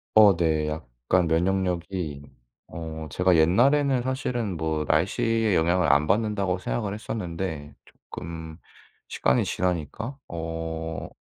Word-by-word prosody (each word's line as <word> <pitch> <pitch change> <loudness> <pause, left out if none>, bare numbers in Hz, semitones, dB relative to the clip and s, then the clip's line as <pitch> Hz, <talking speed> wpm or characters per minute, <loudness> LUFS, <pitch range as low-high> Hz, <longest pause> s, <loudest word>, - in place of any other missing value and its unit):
어 105 -4 +8
네. 80 -3 +1
약간 75 +4 -1
면역력이 90 -3 -1 0.5
어 80 -1 -6
제가 90 +5 +3
옛날에는 125 - +4
사실은 120 - -2
뭐 80 -1 -1
날씨의 105 +6 +2
영향을 85 -1 +3
안 75 +3 +4
받는다고 100 -2 +1
생각을 105 +1 -2
했었는데 85 -8 -5
쪼끔 80 0 -9 0.5
시간이 65 - +2
지나니까 90 - -2
어 80 -1 -5
85 Hz, 250 characters per minute, -26 LUFS, 80-100 Hz, 0.5 s, 어